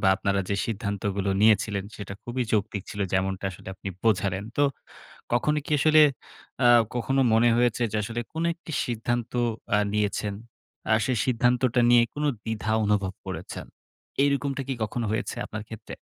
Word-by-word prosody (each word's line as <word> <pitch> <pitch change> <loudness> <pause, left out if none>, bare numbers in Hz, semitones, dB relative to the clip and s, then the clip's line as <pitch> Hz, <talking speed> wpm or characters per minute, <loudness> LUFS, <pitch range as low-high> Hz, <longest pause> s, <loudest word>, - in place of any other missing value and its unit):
বা 95 - +1
আপনারা 100 -1 0
যে 100 - 0
সিদ্ধান্তগুলো 100 -2 -2
নিয়েছিলেন, 105 -2 +3
সেটা 100 -1 -7
খুবই 125 +1 -2
যৌক্তিক 105 -2 0
ছিল, 105 - -6
যেমনটা 95 +1 0
আসলে 95 0 -11
আপনি 95 - -7 0.2
বোঝালেন। 100 -2 +1
তো 145 - +3 0.7
কখনো 150 +5 +2
কি - - -7
আসলে 155 +1 +6 0.6
আ - - +8 0.3
কখনো 135 +3 +1
মনে 115 +1 +5
হয়েছে 120 0 +2
যে 110 - -1
আসলে 120 +2 -3
কোন 160 +1 -2
একটি 170 -1 -11
সিদ্ধান্ত 120 0 -2 0.4
আ - - +4 0.2
নিয়েছেন। 105 -1 0 0.6
আ - - +6
সেই 130 -3 0
সিদ্ধান্তটা 125 0 +2
নিয়ে 120 -1 +7
কোনো 150 0 -1 0.2
দ্বিধা 110 -1 -2
অনুভব 100 -2 +1
করেছেন? - - -6 0.6
এরকমটা 140 -1 0
কি 135 - -1
কখনো 115 +2 -2
হয়েছে 115 +3 -2
আপনার 110 -1 -6
ক্ষেত্রে? 110 - -9
110 Hz, 155 wpm, -26 LUFS, 100-125 Hz, 0.7 s, আ